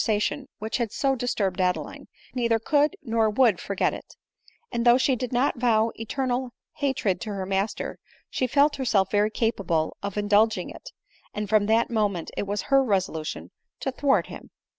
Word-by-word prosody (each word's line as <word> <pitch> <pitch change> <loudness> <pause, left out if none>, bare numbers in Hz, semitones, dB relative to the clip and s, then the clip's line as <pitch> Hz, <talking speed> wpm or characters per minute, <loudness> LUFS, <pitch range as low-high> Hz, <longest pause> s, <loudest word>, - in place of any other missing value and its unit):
sation 220 +5 0
which 220 +1 -3
had 235 -4 -2
so 270 +2 +1
disturbed 200 -7 -1
Adeline, 185 - -2 0.3
neither 235 -3 +2
could 295 - +2
nor 225 -3 +2
would 220 -4 +3
forget 200 -1 0
it; - - -10 0.6
and 235 - -1
though 240 0 +6
she 265 0 +2
did 250 0 -4
not 255 +1 +1
vow 230 -2 +3
eternal 255 +2 -2 0.3
ha 285 - +1
tred 195 -8 -1
to 215 - -5
her 195 -2 -3
master, 195 +2 -2 0.3
she 255 - -1
felt 285 +3 +3
herself 215 -8 +1
very 210 0 +3
capable 200 -8 -1
of 200 -1 -4
uw 205 0 -1
dulging 215 +2 +3
it, - - -10 0.5
and 210 0 -2
from 205 0 +3
that 225 +2 +2
moment 205 -7 -1
it 205 - -3
was 205 -1 -2
her 275 -1 +4
resolution 190 -8 -2 0.3
to» 265 - -2
thwart 270 +1 +2
him. - - -10
225 Hz, 180 wpm, -25 LUFS, 205-255 Hz, 0.6 s, though